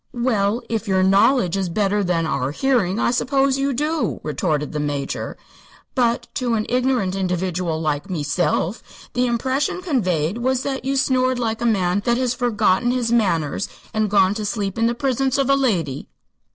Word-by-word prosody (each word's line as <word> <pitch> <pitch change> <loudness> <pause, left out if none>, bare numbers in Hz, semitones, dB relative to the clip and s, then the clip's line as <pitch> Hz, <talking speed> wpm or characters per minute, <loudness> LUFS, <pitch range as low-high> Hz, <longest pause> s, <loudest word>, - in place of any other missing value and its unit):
"Well, 230 -2 +1
if 225 -1 -3
your 190 -1 +2
knowledge 195 0 +3
is 190 -2 -1
better 205 +3 +1
than 175 -3 0
our 135 -4 -1
hearing, 220 - +1
I - - +2
suppose 270 +2 +1
you 275 +1 +1
do," 300 +4 -1
retorted 150 -1 -1
the 150 - -3
Major. 145 -2 -3 0.6
"But 240 -2 +1
to 245 -2 0
an 215 -1 -1
ignorant 250 -6 +1
individual 180 -3 -1
like 155 +3 -2
meself 175 +4 -1 0.3
the 250 0 +1
impression 260 +7 0
conveyed 185 - 0
was 260 +1 0
that 270 -1 -3
you 275 +1 0
snored 255 -2 +2
like 225 -2 -2
a 240 - +1
man 190 -3 +1
that 240 -1 +2
has 250 -1 0
forgotten 240 -3 +1
his 245 -2 0
manners 180 -7 +1 0.2
an' 215 -1 +1
gone 195 -1 +3
to 215 0 -4
sleep 205 -1 -2
in 230 - +3
the 235 - 0
prisence 265 +1 0
of 275 -1 +2
a - - +5
lady." 180 - -1
220 Hz, 175 wpm, -21 LUFS, 180-255 Hz, 0.6 s, a